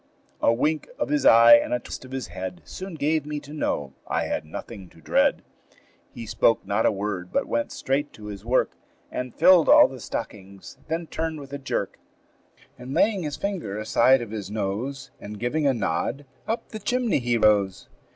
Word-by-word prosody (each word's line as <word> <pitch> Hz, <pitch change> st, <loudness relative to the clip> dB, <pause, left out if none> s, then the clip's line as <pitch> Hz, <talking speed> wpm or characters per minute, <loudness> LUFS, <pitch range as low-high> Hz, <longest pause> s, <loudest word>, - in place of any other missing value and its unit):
A -, -, +4 dB
wink 150 Hz, +6 st, 0 dB
of -, -, -2 dB
his 145 Hz, -2 st, +2 dB
eye 115 Hz, +1 st, +9 dB
and 115 Hz, -, -1 dB
a -, -, -2 dB
twist -, -, -8 dB
of 130 Hz, -, -13 dB
his 130 Hz, -7 st, -5 dB
head 90 Hz, -1 st, -6 dB
Soon 190 Hz, -2 st, -7 dB
gave 155 Hz, 0 st, 0 dB
me 150 Hz, 0 st, -4 dB
to 145 Hz, +1 st, -12 dB
know 70 Hz, -, -2 dB
I -, -, 0 dB
had -, -, -3 dB
nothing 95 Hz, +4 st, -9 dB
to -, -, -21 dB
dread. 80 Hz, -, +2 dB, 0.7 s
He 115 Hz, -, -8 dB
spoke 115 Hz, +1 st, +2 dB
not 100 Hz, +3 st, +1 dB
a -, -, +3 dB
word, 100 Hz, -3 st, -4 dB
but -, -, 0 dB
went 115 Hz, 0 st, -2 dB
straight 140 Hz, +2 st, -1 dB
to 105 Hz, -, -12 dB
his 100 Hz, -2 st, -8 dB
work, 125 Hz, +3 st, +1 dB, 0.4 s
And 125 Hz, -1 st, -5 dB
filled 185 Hz, -3 st, +6 dB
all -, -, +8 dB
the 130 Hz, -1 st, -10 dB
stockings; 100 Hz, -3 st, -7 dB
then 165 Hz, +1 st, -2 dB
turned 160 Hz, -1 st, -4 dB
with 140 Hz, -1 st, -11 dB
a 140 Hz, -, -4 dB
jerk, 135 Hz, -, -3 dB, 0.8 s
And 125 Hz, +2 st, -6 dB
laying 205 Hz, -3 st, +3 dB
his 150 Hz, -3 st, -4 dB
finger 185 Hz, -, -3 dB
aside 120 Hz, +4 st, +3 dB
of 110 Hz, -, -9 dB
his 105 Hz, -4 st, -5 dB
nose, 110 Hz, +7 st, -4 dB
And 105 Hz, +1 st, -8 dB
giving 145 Hz, +5 st, 0 dB
a 135 Hz, -, +3 dB
nod, 120 Hz, -, -2 dB, 0.2 s
up 225 Hz, +2 st, -3 dB
the 215 Hz, -, -7 dB
chimney 240 Hz, -, 0 dB
he 120 Hz, -1 st, 0 dB
rose. 105 Hz, -4 st, +2 dB
125 Hz, 195 wpm, -25 LUFS, 105-150 Hz, 0.8 s, eye